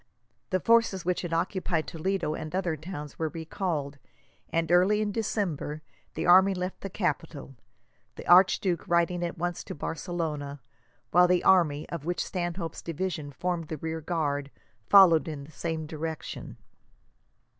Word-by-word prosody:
The 185 - +1
forces 230 -3 +3
which 180 0 0
had 175 - -5
occupied 170 -1 0
Toledo 180 -1 -2
and 155 +2 -5
other 180 -4 0
towns 150 -2 -8
were 160 -1 0
recalled, 160 -3 -3 0.5
and, 165 0 0
early 185 +4 +4
in 210 -1 0
December, 180 -8 -2 0.3
the - - -2
army 190 +2 +6
left 180 +1 -4
the 195 - -5
capital; 165 -7 -3 0.6
the - - -10
archduke 180 -1 +4
riding 175 +1 +2
at 175 +1 -3
once 175 +1 -3
to - - -6
Barcelona, 150 -3 -4 0.5
while 180 +1 +6
the 180 0 +2
army, 155 -6 +4
of 170 -4 -5
which 175 +2 -2
Stanhope's 175 -2 -4
division 165 -3 -4
formed 170 +2 -3
the 155 - -5
rear 160 +2 -4
guard, 145 -4 -1 0.4
followed 175 -7 +7
in 150 -3 -5
the 145 - -13
same 160 +1 -3
direction. 160 0 -6
170 Hz, 145 wpm, -28 LUFS, 155-180 Hz, 0.6 s, followed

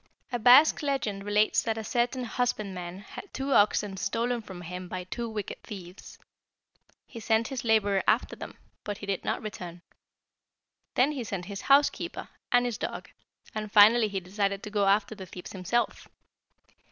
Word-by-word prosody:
"A 245 - -1
Basque 250 +7 +7
legend 240 -9 -2
relates 210 +1 +3
that 225 -1 -2
a 220 - -4
certain 245 +3 0
husbandman 195 -7 -3
had 375 - -10
two 270 +1 -2
oxen 205 -1 +3
stolen 235 +5 -1
from 190 -4 -10
him 180 +1 -7
by 180 +1 -5
two 230 +6 -5
wicked 210 -3 -5
thieves. 185 -2 -10 0.9
He 235 - -10
sent 225 +1 +1
his 265 -2 -4
laborer 205 -4 +3
after - - +2
them, - - -9 0.3
but 205 -1 -4
he 205 - -8
did 195 -2 -2
not - - -2
return. 175 -5 -7 1.1
Then 265 +4 +4
he 275 -5 -4
sent 195 -5 -4
his 200 +1 -6
housekeeper, 280 +1 +2 0.2
and 245 0 +4
his 240 -3 -3
dog, - - -5 0.4
and 215 -1 -4
finally 215 +2 +7
he 200 -2 -3
decided 195 +2 -2
to 210 - -7
go 205 -2 +2
after 200 +2 +2
the 190 -3 -9
thieves 180 - -9
himself. 195 +6 -1
210 Hz, 165 wpm, -28 LUFS, 195-240 Hz, 1.1 s, Basque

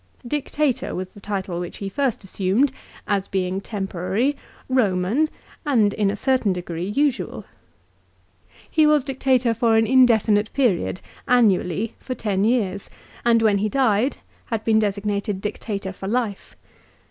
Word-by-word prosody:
Dictator 295 0 -1
was 185 +1 -4
the 205 - -15
title 195 -3 -3
which 175 -1 -6
he 200 - -5
first 265 +2 -1
assumed, 195 +8 +1 0.4
as 200 -1 0
being 190 0 -1
temporary, 195 +6 -1 0.3
Eoman, 235 +3 +2 0.3
and 230 -9 +3
in 205 -2 +1
a 200 - -1
certain 255 -2 +1
degree 175 -1 -4
usual. 275 +5 -1 1.2
He 310 -1 +3
was 300 -2 +4
Dictator 260 -3 +1
for 230 -1 +2
an 225 - +4
in 260 +1 +6
definite 215 -2 +2
period, 220 -8 +1 0.3
annually, 215 -3 +2
for 255 - -5
ten 200 -4 -1
years, 205 -5 0 0.3
and, 230 -1 +4
when 205 -2 +3
he 215 +2 0
died, 250 +1 +2 0.3
had 225 -3 -3
been 220 -1 +3
designated 205 -1 -1
Dictator 200 -1 -4
for 190 - -7
life. 220 -2 -2
215 Hz, 140 wpm, -22 LUFS, 195-250 Hz, 1.2 s, in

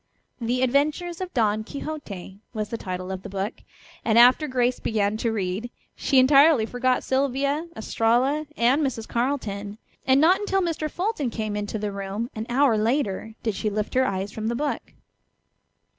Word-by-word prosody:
"The 245 +2 0
Adventures 305 +7 0
of 370 -1 -4
Don 215 -5 +1
Quixote," 220 - -7 0.2
was 215 -1 -2
the 230 - -3
title 185 -1 -5
of 190 -1 -4
the - - -8
book, 195 +3 -4 0.4
and 225 -1 +2
after 250 +6 +6
Grace 250 -2 +1
began 210 -2 0
to 230 +1 0
read 205 +2 -2 0.3
she 275 - +1
entirely 275 -1 +6
forgot 250 +2 0
Sylvia, 280 +4 0
Estralla, 245 +7 +1
and 250 +6 +3
Mrs. 240 -6 -2
Carleton. 215 -5 -2 0.3
And 265 +1 +5
not 340 +5 +5
until 410 -2 0
Mr. 320 -3 -2
Fulton 355 - -2
came 215 -2 -3
into 210 +1 -3
the 210 -1 -3
room 200 +5 -4
an 220 +1 -5
hour 245 -3 +3
later 220 -2 -1
did 220 - 0
she 215 +2 -2
lift 210 +1 -3
her 260 0 +3
eyes 195 +1 -2
from 220 0 -4
the 235 - 0
book. 290 +3 -3
240 Hz, 170 wpm, -25 LUFS, 210-280 Hz, 0.4 s, after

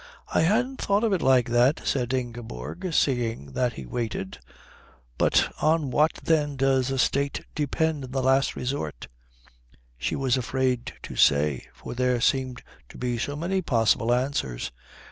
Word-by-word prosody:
"I - - +4
hadn't 250 +10 +1
thought 200 +2 +1
of 220 -3 +2
it 180 - +1
like 130 -2 +4
that," 120 +5 +3
said 125 -2 0
Ingeborg, 120 - -4
seeing 115 - 0
that 125 - 0
he 65 - -8
waited. 95 - -4 0.8
"But - - +3
on 155 -3 +2
what 150 +5 +3
then 150 -3 +1
does 135 -1 +2
a 135 - -1
State 140 +3 0
depend 150 -1 -1
in 130 - -11
the 130 0 -1
last 135 +1 +3
resort?" 80 - -4 0.9
She - - -1
was 135 -1 +1
afraid 130 -1 -1
to - - -7
say, 70 -2 +3
for - - -8
there 125 0 +1
seemed 130 0 0 0.3
to - - -12
be 125 -1 -2
so 145 +5 -2
many 185 +5 -1
possible 115 - +2
answers. 120 - -1
130 Hz, 155 wpm, -26 LUFS, 120-145 Hz, 0.9 s, I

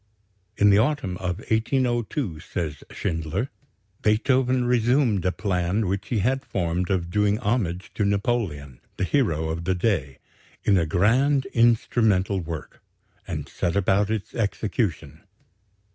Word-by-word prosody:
In 105 0 +5
the 100 - +5
autumn 130 -6 0
of 90 -1 -3
1802, 120 - 0
says 80 -3 -5
Schindler, 90 - -3 0.5
Beethoven 125 +3 +2
resumed 120 -3 +2
a 90 - +3
plan 95 +1 -1
which 95 +1 -2
he 120 - -1
had 135 +2 +1
formed 90 -5 -2
of 90 -3 -1
doing 105 +2 +2
homage 100 -6 -1
to 105 - -1
Napoleon, 100 - -1 0.2
the - - -1
hero 85 - +1
of 85 +1 -4
the 95 +1 +1
day, 85 - 0 0.5
"in 100 - +4
a 80 - 0
grand 130 - +3
instrumental 110 -4 +3
work," 80 -2 -7 0.5
and - - -4
set 85 +1 -2
about 100 +1 +2
its 110 -2 -3
execution. 105 - -2
100 Hz, 130 wpm, -24 LUFS, 90-120 Hz, 0.5 s, In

